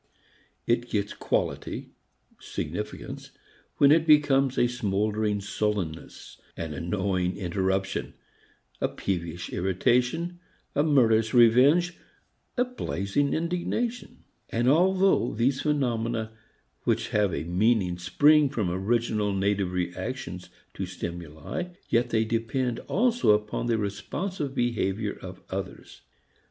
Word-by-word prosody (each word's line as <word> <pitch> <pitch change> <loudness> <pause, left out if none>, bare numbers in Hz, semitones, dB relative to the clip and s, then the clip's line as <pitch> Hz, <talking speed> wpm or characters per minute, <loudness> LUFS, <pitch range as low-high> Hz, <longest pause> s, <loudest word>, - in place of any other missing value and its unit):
It 120 +1 +1
gets 100 -1 -1
quality, - - -2 0.5
significance, - - -5 0.5
when 140 0 +6
it 160 +1 +4
becomes 140 -3 +4
a - - +4
smouldering 105 -2 0
sullenness, 100 -5 -4 0.2
an 80 -2 -4
annoying 90 +2 -1
interruption, 95 +1 -1 0.7
a - - +3
peevish 85 -2 -4
irritation, 125 - +1 0.3
a 145 - +2
murderous 115 -7 +3
revenge, 135 +10 +5 0.6
a 250 - +3
blazing 140 - -1
indignation. 180 +9 -2 0.3
And 120 +2 0
although 185 - +3
these 130 +4 +1
phenomena 115 -6 0 0.5
which - - 0
have 105 -2 +2
a 70 - -2
meaning 90 +1 +1
spring 145 - +4
from 105 -8 -1
original 105 +2 0
native 100 -1 0
reactions 90 +1 -4 0.2
to 95 - -4
stimuli, 85 - -6
yet 120 +1 +2
they 110 -1 +2
depend 115 +2 -1
also 235 - +3
upon 105 +2 -1
the 115 -1 +2
responsive 135 - -3
behavior 110 -4 0
of - - -9
others. - - -6
110 Hz, 105 wpm, -27 LUFS, 95-140 Hz, 0.7 s, when